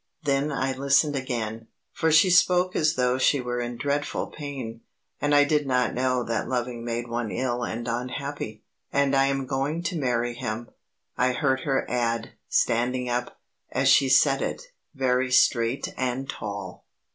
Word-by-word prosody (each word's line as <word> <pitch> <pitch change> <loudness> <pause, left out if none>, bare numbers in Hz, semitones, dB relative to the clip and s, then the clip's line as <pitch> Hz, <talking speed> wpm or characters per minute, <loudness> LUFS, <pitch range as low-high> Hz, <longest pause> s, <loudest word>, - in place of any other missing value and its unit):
then 140 +1 +1
I 135 -1 -1
listened 140 +2 +3
again, 115 -4 -3 0.2
for 160 - 0
she 165 +4 +6
spoke 180 0 +4
as 155 0 +2
though 125 0 +1
she 140 +2 +3
were 125 -1 -3
in 120 0 -4
dreadful 145 +3 -2
pain, 130 -6 -6 0.4
and 145 0 +2
I 145 - +7
did 150 -1 +1
not 125 -3 +1
know 130 0 0
that 115 0 -2
loving 120 -2 -2
made 120 0 -3
one 120 -1 -3
ill 120 0 -2
and 120 +1 -4
unhappy. 125 -1 -4 0.3
"And 140 0 +2
I 135 0 +4
am 135 -1 -1
going 140 +6 -2
to 175 -2 -2
marry 120 -3 0
him," 120 -2 -5 0.5
I 125 0 +3
heard 135 -1 +1
her 135 -2 +1
add, 115 -2 -1 0.2
standing 125 +2 +1
up, 120 0 -3 0.3
as - - +2
she 135 -1 +5
said 135 +1 +4
it, - - -4 0.2
very 130 -1 +1
straight 120 +1 +2
and 130 +1 -2
tall. 100 -5 -6
130 Hz, 165 wpm, -25 LUFS, 120-140 Hz, 0.5 s, I